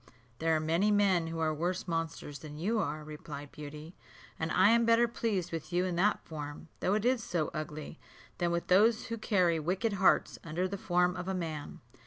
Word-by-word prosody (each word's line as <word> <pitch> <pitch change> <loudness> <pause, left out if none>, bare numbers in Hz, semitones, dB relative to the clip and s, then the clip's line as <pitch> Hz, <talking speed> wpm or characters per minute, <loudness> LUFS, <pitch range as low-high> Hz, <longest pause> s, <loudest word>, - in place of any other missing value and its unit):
"There 160 0 +2
are - - +2
many 165 +6 +2
men 195 -5 +3
who 165 0 -4
are 160 -1 +1
worse 175 +4 -2
monsters 165 -3 -3
than 150 -1 -9
you 215 +8 0
are," 155 -6 -2
replied 150 -1 -8
Beauty; 150 +2 -9 0.5
"and 160 0 -1
I 185 +4 +5
am 235 0 +5
better 230 +1 +5
pleased 210 -6 -2
with 165 +1 -5
you 180 +1 +2
in 180 -2 -2
that 205 +4 +2
form, 150 0 -7
though 190 - +1
it 215 +1 0
is 250 -2 +2
so 165 -7 -1
ugly, 155 +1 -6 0.4
than 175 -1 +1
with 170 0 -1
those 215 +5 +4
who 230 - -2
carry 180 -7 +2
wicked 190 +8 0
hearts 195 -1 +3
under 170 +3 -1
the 195 - -4
form 180 -1 +1
of 180 0 -5
a 190 - -1
man." 160 -4 -5
175 Hz, 205 wpm, -31 LUFS, 155-200 Hz, 0.5 s, I